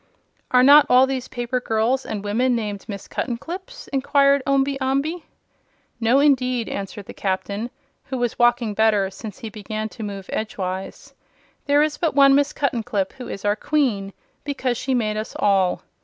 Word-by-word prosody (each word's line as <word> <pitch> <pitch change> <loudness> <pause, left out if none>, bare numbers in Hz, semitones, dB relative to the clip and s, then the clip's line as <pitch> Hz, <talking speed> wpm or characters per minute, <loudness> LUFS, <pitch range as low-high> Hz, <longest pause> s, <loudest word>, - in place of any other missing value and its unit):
"Are 250 0 +5
not 290 +2 +8
all 255 +1 +6
these 265 -1 -3
paper 245 +1 -2
girls 240 +3 0
and 205 -2 -4
women 240 +5 +1
named 210 -3 -4
Miss 200 -3 -7
Cuttenclips?" 360 - -5
inquired 280 0 +3
Omby 275 0 +1
Amby. 275 +6 -1 0.8
"No 235 +3 +3
indeed," 255 -5 +2
answered 200 0 -6
the - - -10
Captain, 200 +4 -3 0.4
who 265 -2 -4
was 245 -2 -2
walking 240 -2 +3
better 210 -3 +2
since 205 +1 -9
he 225 - -7
began 215 +1 -5
to 225 - -11
move 200 -2 -6
edgewise. 190 -3 -4 0.5
"There 290 +1 +4
is 300 -1 -2
but 330 -5 0
one 275 -1 +7
Miss 285 +1 +3
Cuttenclip, 225 -8 -1
who 255 -3 -9
is 195 - -7
our 205 0 +2
Queen, 230 -8 0 0.3
because 265 -3 -2
she 260 +2 -1
made 215 -3 0
us 215 - -5
all. 190 -3 +2
240 Hz, 165 wpm, -22 LUFS, 210-275 Hz, 0.8 s, not